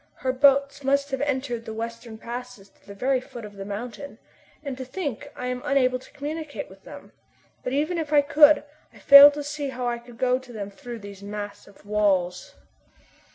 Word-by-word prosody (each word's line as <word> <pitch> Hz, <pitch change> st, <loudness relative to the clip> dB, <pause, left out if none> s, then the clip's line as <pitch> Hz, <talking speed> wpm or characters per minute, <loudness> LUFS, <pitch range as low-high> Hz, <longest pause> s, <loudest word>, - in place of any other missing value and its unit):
Her 255 Hz, 0 st, -2 dB
boats 280 Hz, +1 st, +3 dB
must 280 Hz, +1 st, +1 dB
have 270 Hz, 0 st, -2 dB
entered 260 Hz, -5 st, -2 dB
the 220 Hz, -, -6 dB
western 230 Hz, 0 st, -6 dB
passes 240 Hz, -3 st, -8 dB
to -, -, -30 dB
the 200 Hz, -, -10 dB
very 255 Hz, +4 st, +1 dB
foot 245 Hz, -4 st, -10 dB
of 205 Hz, -, -11 dB
the 195 Hz, -, -7 dB
mountain. 235 Hz, +7 st, -7 dB, 0.5 s
And 280 Hz, -3 st, -4 dB
to -, -, -4 dB
think 285 Hz, -, -5 dB
I 250 Hz, -, -6 dB
am 250 Hz, 0 st, -3 dB
unable 255 Hz, -2 st, +2 dB
to -, -, -17 dB
communicate 305 Hz, +1 st, -6 dB
with -, -, -17 dB
them! -, -, -12 dB, 0.5 s
But 250 Hz, -, -3 dB
even 310 Hz, +5 st, 0 dB
if 310 Hz, -2 st, -4 dB
I 295 Hz, -1 st, +6 dB
could, 295 Hz, +1 st, +6 dB, 0.3 s
I -, -, -18 dB
fail 280 Hz, +1 st, +10 dB
to 290 Hz, 0 st, -5 dB
see 290 Hz, -1 st, -4 dB
how 250 Hz, -1 st, -5 dB
I 240 Hz, 0 st, -2 dB
could 240 Hz, 0 st, -15 dB
go 255 Hz, +1 st, +2 dB
to 260 Hz, -1 st, -14 dB
them 205 Hz, -3 st, -6 dB
through 235 Hz, +3 st, -9 dB
these 200 Hz, -1 st, -10 dB
massive 205 Hz, 0 st, -8 dB
walls." 200 Hz, -4 st, 0 dB
255 Hz, 200 wpm, -25 LUFS, 220-280 Hz, 0.5 s, fail